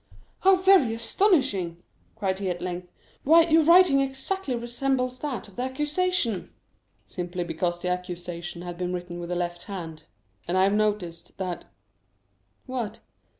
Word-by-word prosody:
"How 385 0 +6
very 370 -11 +5
astonishing!" 225 - +1 0.3
cried 195 -3 -1
he 195 -2 -1
at 175 -1 -2
length. 180 0 -5 0.3
"Why 325 +4 +7
your 325 0 +4
writing 335 -3 +6
exactly 270 +3 -2
resembles 250 +1 -1
that 265 -10 -4
of 200 - -17
the - - -2
accusation." 295 - 0 0.5
"Simply 180 0 -4
because 175 +1 -2
that 180 - 0
accusation 175 -1 -5
had 175 -1 -7
been 180 0 -2
written 175 -1 -5
with 170 0 -6
the 180 - -1
left 175 0 -3
hand; 165 -6 -7 0.4
and 175 +2 +1
I 185 - +5
have 195 +1 +3
noticed 205 -6 -1
that——" 185 -2 -4 1.0
"What?" 235 -4 -4
200 Hz, 150 wpm, -26 LUFS, 175-270 Hz, 1.0 s, Why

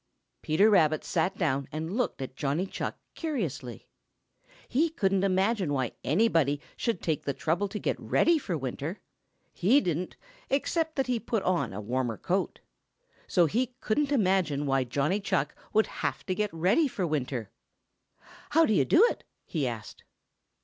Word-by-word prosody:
Peter 160 +7 +4
Rabbit 155 -7 +4
sat 190 +1 0
down 140 -6 0
and 160 +5 -4
looked 240 - -1
at 130 0 -8
Johnny 145 +6 -1
Chuck - - -4 0.2
curiously. 185 - -4 0.8
He 315 +7 +2
couldn't 195 -10 +1
understand 190 -4 +1
why 130 -3 -1
anybody 155 - +2 0.2
should 230 -7 -2
take 155 -4 0
the 140 - -2
trouble 170 +6 0
to 200 - -5
get - - -2
ready 340 -2 +3
for 180 - -3
winter. 140 - -4 0.5
He 225 +11 +4
didn't, 175 - -2 0.3
excepting 320 +3 0
that 270 - +1
he 245 -1 0
put 220 -1 -2
on 185 -1 +1
a 95 - -5
warmer 120 +1 -2
coat. 185 +2 -1 0.7
So 175 -2 +4
he 245 - -1
couldn't 285 +6 0
imagine 185 - +2
why 135 -2 +1
Johnny 145 - 0
Chuck 205 - -1 0.2
should 220 0 +4
have - - -4
to 185 - -1
get 210 +1 -1
ready 185 - +3
for 200 -8 -2
winter. 130 - -2 1.0
"How 325 +2 +5
do 220 - +2
you 140 -9 +3
do 375 - +6
it?" - - -4 0.2
he 150 -6 -1
asked. 115 -3 -7
185 Hz, 160 wpm, -28 LUFS, 145-220 Hz, 1.0 s, do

